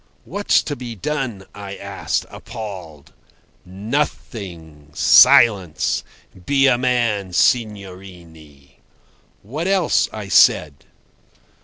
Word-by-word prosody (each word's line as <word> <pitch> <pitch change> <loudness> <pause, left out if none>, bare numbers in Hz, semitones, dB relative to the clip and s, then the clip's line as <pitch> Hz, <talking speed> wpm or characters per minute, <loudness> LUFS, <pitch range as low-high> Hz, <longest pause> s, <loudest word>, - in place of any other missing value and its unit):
"What's 205 0 +1
to 145 - -4
be 120 -3 -8
done?" 120 -4 -4
I 100 -1 -8
asked, - - -4
appalled. 95 - -10 0.5
"Nothing. 95 - -5
Silence! 95 -8 +4 0.4
Be 140 -1 +3
a 130 -2 +4
man, 120 -7 -1
signorine." 90 - -3 0.7
"What 150 - -5
else?" 190 -4 +1
I 105 -2 -7
said. 75 -6 +3
100 Hz, 90 wpm, -19 LUFS, 90-125 Hz, 0.7 s, Silence